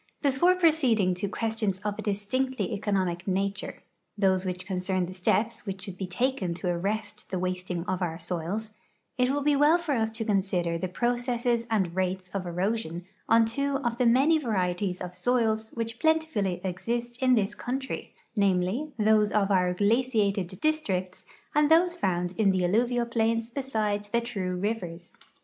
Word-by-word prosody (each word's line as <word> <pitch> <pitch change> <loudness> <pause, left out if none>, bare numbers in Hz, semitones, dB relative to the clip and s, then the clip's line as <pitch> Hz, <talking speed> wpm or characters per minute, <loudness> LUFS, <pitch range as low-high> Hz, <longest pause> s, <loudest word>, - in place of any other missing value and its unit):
Before 285 +7 +4
proceeding 265 - +3
to 190 +3 -2
questions 220 -3 -1
of 205 -1 -3
a - - -1
distinctly 210 +2 -1
economic 190 -3 -1
nature 195 +1 -2 0.2
— - - -49
those 190 -2 +2
which 185 0 -4
concern 185 -1 -1
the 180 - -8
steps 215 +4 0
which 190 -1 -3
should 190 -2 -4
be 190 - -3
taken 190 -2 -1
to 180 +1 -3
arrest 205 +4 -3
the 190 - -2
wasting 180 -1 -3
of 185 0 -2
our 165 -2 -1
soils 180 +6 -3 0.2
— - - -46
it 250 0 +3
will 285 +1 0
be 295 0 +3
well 295 +4 +5
for 340 -3 -4
us 225 -5 +1
to 225 0 -4
consider 190 -5 +1
the 185 - -2
pro 240 +7 0
cesses 240 -1 0
and 190 -6 0
rates 185 0 -2
of 195 -2 -3
erosion 180 -1 -2 0.2
on 225 0 +6
two 280 +5 -1
of 240 -1 -1
the 250 - +4
many 275 +7 +5
varieties 185 -6 -1
of 180 0 -5
soils 220 +2 +1
which 230 0 -3
plentifully 315 - +1
exist 235 +6 -3
in 255 -1 +5
this 205 -2 +1
country, 260 +5 -5 0.2
namely, 200 +8 +1
those 215 -1 +3
of 205 -1 +2
our 180 -2 +3
glaciated 205 -1 +1
districts 195 -13 -1 0.3
and 295 0 +4
those 345 +2 +5
found 180 - -1
in 210 -3 +4
the 185 -2 +2
alluvial 240 +5 +2
plains 230 0 0
beside 215 -6 -1
the 235 +3 0
true 195 -6 -3
rivers. 180 -3 -4
210 Hz, 170 wpm, -27 LUFS, 185-240 Hz, 0.3 s, on